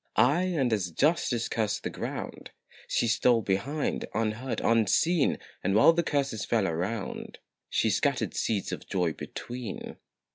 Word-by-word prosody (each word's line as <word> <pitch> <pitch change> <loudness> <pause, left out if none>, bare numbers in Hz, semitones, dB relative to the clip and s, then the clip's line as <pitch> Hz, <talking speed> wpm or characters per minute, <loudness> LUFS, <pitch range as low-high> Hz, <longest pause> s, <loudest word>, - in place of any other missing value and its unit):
Aye, 170 +10 +3
and 125 -5 +2
as 95 -5 0
Justice 125 - +1
cursed 110 -3 -1
the - - -3
ground, - - -6 0.4
She 120 - +1
stole 115 0 +3
behind, 135 +11 -1
unheard, 115 +4 -1
unseen 125 - +3 0.3
And 95 +2 +1
while 115 +10 +7
the 170 - +2
curses 140 -9 -1
fell 110 -4 +1
around, 90 +5 -3 0.3
She - - +2
scattered - - 0
seeds 105 -4 -1
of - - -6
joy 90 -4 +1
between. 120 +2 -7
115 Hz, 140 wpm, -28 LUFS, 100-140 Hz, 0.4 s, while